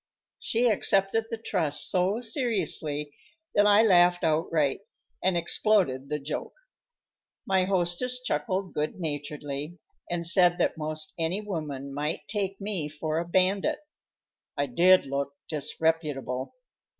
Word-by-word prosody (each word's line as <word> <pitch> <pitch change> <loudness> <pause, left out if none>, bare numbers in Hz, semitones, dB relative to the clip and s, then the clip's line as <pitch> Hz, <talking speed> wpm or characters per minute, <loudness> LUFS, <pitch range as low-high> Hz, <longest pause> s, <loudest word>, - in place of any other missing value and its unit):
She 235 +2 +1
accepted 205 0 +2
the 230 - -3
trust 165 -9 -2
so 190 +5 +1
seriously 195 - -1 0.4
that 205 0 +4
I 205 +2 +6
laughed 175 -4 +5
outright, 155 -2 +1 0.4
and 185 -1 +2
exploded 170 -6 +1
the 150 - -1
joke. 150 +1 -5 0.9
My 190 -1 +2
hostess 190 +7 0
chuckled 185 -3 -2
good 150 +4 -2
naturedly, 145 0 -4 0.3
and 175 -1 -1
said 175 0 +5
that 175 - +1
most 155 0 -4
any 165 +4 0
woman 150 -9 -5
might 150 +3 -3
take 195 -2 -2
me 195 -7 -2
for 155 +1 -2
a 170 - -4
bandit. 195 - +2 0.8
I 145 - +1
did 180 +8 +5
look 140 +1 -3
disreputable. 150 - -2
170 Hz, 125 wpm, -27 LUFS, 150-195 Hz, 0.9 s, I